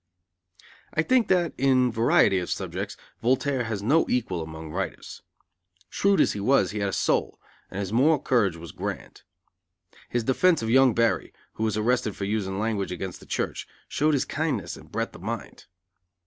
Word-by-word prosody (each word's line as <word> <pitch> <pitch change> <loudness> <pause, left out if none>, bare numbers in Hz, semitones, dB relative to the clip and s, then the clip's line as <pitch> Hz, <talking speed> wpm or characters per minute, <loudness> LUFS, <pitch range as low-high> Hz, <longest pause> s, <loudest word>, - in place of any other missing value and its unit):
I 155 - +3
think 255 +4 +3
that, 175 -3 +2
in 130 -2 +3
variety 110 -4 +4
of 90 - -5
subjects, - - -4 0.2
Voltaire 130 +1 +1
has 105 -3 -3
no 155 +9 +3
equal 105 -9 0
among 80 0 -8
writers. 95 +4 -5 0.7
Shrewd 200 0 +2
as - - +4
he 105 - -5
was, 100 -3 +3
he 105 - -4
had 100 -1 0
a - - -3
soul, - - 0 0.3
and 95 - -6
his 100 +1 -3
moral 145 +7 +4
courage 115 - +1
was 85 0 -9
grand. - - -6 0.9
His 120 -1 -1
defense 160 +4 +3
of 110 - -1
young 130 -2 +5
Barry, 115 -1 +1 0.2
who 110 - -4
was 110 -1 0
arrested 115 -1 +1
for 100 - -4
using 100 -2 -2
language 105 -2 -1
against 90 0 -5
the - - -16
church, - - -3 0.2
showed 150 +1 +1
his 135 - 0
kindness 135 - -2
and - - -15
breadth - - -2
of - - -12
mind. - - -6
115 Hz, 175 wpm, -26 LUFS, 100-135 Hz, 0.9 s, young